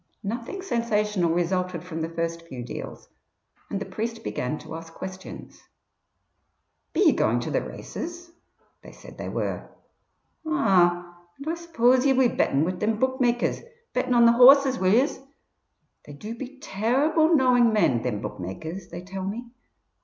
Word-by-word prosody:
Nothing 235 - -5
sensational 210 - 0
resulted 175 0 -1
from 165 -3 -6
the 160 - -2
first 165 0 -4
few 125 -5 -7
deals, 120 - -8 0.6
and 200 - -2
the 200 - -5
priest 225 +4 -5
began 125 +5 -3
to - - -10
ask 165 0 -8
questions. 185 0 -9 1.3
"Be - - 0
ye - - +7
going - - +1
to - - -4
the - - +1
races?" 345 +1 -7 0.5
They - - -13
said - - -14
they - - -4
were. - - -3 0.7
"Ah! 175 - +2 0.2
and 280 - -9
Oi 325 - 0
suppose 260 -7 +2
ye'll 270 -2 +3
be 260 -1 +5
betting 140 -8 +1
wid 180 +1 -3
thim 215 +1 0
bookmakers 255 -1 +1 0.3
betting 250 0 0
on 235 -1 +6
the 235 - +7
horses, 265 +2 +7
will 185 0 +3
yez? 255 +7 +2 0.9
They 145 - -10
do 210 +10 -7
be 265 +3 -8
terrible 290 - +2
knowing 250 -4 +4
men, 130 - +2
thim 110 -5 -2
bookmakers, 160 - -6
they 175 +1 -8
tell 190 0 -6
me. 230 +5 -5
215 Hz, 155 wpm, -25 LUFS, 175-255 Hz, 1.3 s, ye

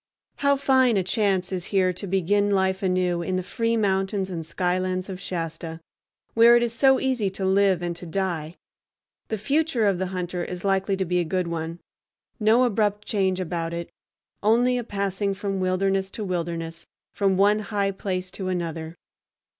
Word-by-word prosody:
How 280 0 +3
fine 260 -4 +3
a 190 - +2
chance 190 -1 0
is 180 -2 -3
here 185 -2 +2
to 190 +3 -7
begin 195 +2 +2
life 190 -1 +1
anew 180 -2 +1
in 185 +2 -2
the 185 - -1
free 230 +4 -1
fountains 195 -1 0
and 165 -2 -4
skylands 185 +3 -1
of 185 -1 -6
Shasta, 165 -2 -5 0.5
where 230 +1 +7
it 240 - +4
is 235 -1 -1
so 265 +2 +4
easy 255 -7 0
to 190 0 -4
live 190 -2 +3
and 175 -1 -2
to 175 - -9
die! 170 -3 -2 0.7
The 220 - -2
future 275 +1 +1
of 195 -3 +2
the 190 - -1
hunter 180 -1 -3
is 180 0 -6
likely 195 0 +1
to 190 - -1
be 180 +1 +1
a - - +2
good 180 +2 -1
one; 165 0 -4 0.6
no 225 +3 +4
abrupt 210 -3 +1
change 190 -3 +1
about 170 -2 -3
it, 170 0 -6 0.5
only 240 +4 +3
a - - -3
passing 200 -1 -2
from 195 0 -3
wilderness 190 +1 +1
to 215 - -3
wilderness, 170 -3 -4 0.3
from 195 -2 +1
one 205 +2 +4
high 200 -2 -1
place 185 -1 -3
to 190 - -5
another. 165 -2 -3
190 Hz, 180 wpm, -25 LUFS, 180-205 Hz, 0.7 s, where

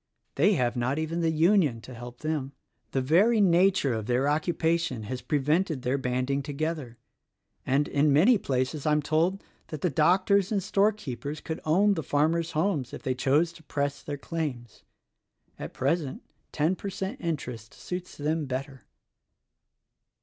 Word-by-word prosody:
They 190 +9 +3
have 125 -7 0
not 125 +3 0
even 160 +2 -2
the 165 - +2
Union 160 - +3
to 130 - -11
help 120 +1 -10
them. 150 -3 -2 0.4
The 135 - -1
very 200 - +4
nature 185 -6 +4
of 110 -2 -4
their 125 +3 +1
occupation 160 -4 0
has 125 +4 -4
always - - -20
prevented 150 0 +1
their 130 +3 0
banding 130 +2 -1
together, 145 -3 -4 0.7
and, 140 +3 +2
in 145 +1 +2
many 195 - +5
places, 135 +2 -2
I 150 - +4
am 150 0 +1
told 165 +6 +1 0.2
that 155 - -7
the 180 - +1
doctors 185 +6 +3
and 200 -3 0
storekeepers 190 - -1
could 160 +1 -5
own 195 +7 +4
the 165 - -2
small 145 -1 -1
farmer's 165 +2 +1
homes 155 -6 0
if - - -8
they 130 - 0
chose 145 +6 +2
to 165 - -15
press 145 -2 -3
their 145 -1 -5
claims. 140 - -5 0.8
At - - -6
present 140 +1 -1 0.3
ten 160 +5 +1
per 200 - -5
cent 195 +5 -5
interest 125 - -4
suits 180 0 -7
them 150 +1 -1
better." 135 +1 -5
150 Hz, 165 wpm, -27 LUFS, 135-170 Hz, 0.8 s, many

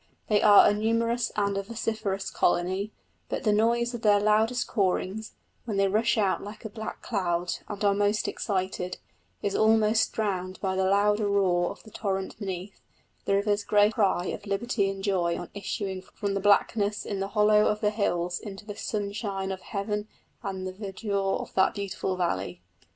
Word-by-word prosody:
They 210 -1 +4
are 205 -1 +8
a - - +4
numerous 230 +3 0
and 200 -1 +1
a - - -1
vociferous 205 -3 -3
colony, 185 +4 +1 0.4
but - - -3
the 210 - +3
noise 235 +3 +2
of 240 - -5
their 205 -3 +5
loudest 220 +4 +2
cawings, 200 +1 -1 0.3
when 215 -4 -2
they 195 0 +4
rush 220 +4 +2
out 200 -3 +1
like 210 +2 -9
a - - -3
black 220 0 -7
cloud 175 -5 -1
and 205 0 -3
are 200 - +5
most 205 +1 +1
excited, 185 -2 -2 0.5
is 200 - 0
almost 220 0 +3
drowned 185 -4 -2
by 190 -1 -1
the 190 0 +1
louder 205 +1 +3
roar 180 -3 +2
of - - -10
the 220 - -14
torrent 195 -1 -3
beneath 190 -1 -6 0.4
the 195 - +2
river's 205 +1 +1
great 210 +1 +4
cry 195 -5 +2
of 205 - -6
liberty 200 0 0
and 195 0 -5
joy 180 -4 +1
on - - -7
issuing 195 -1 -4
from 200 +1 -4
the 200 - 0
blackness 205 +1 +2
in 200 - -3
the 195 - -1
hollow 210 0 +5
of 210 - 0
the 210 -1 +2
hills 180 -4 -1
into 205 -2 -9
the 205 -1 -7
sunshine 200 -2 -3
of 190 -1 -5
heaven 210 +2 -3 0.3
and 190 -3 -4
the 185 - -4
verdure 195 0 -2
of - - -7
that 190 - +3
beautiful 195 -2 -3
valley. 95 - -2
200 Hz, 180 wpm, -27 LUFS, 190-215 Hz, 0.5 s, are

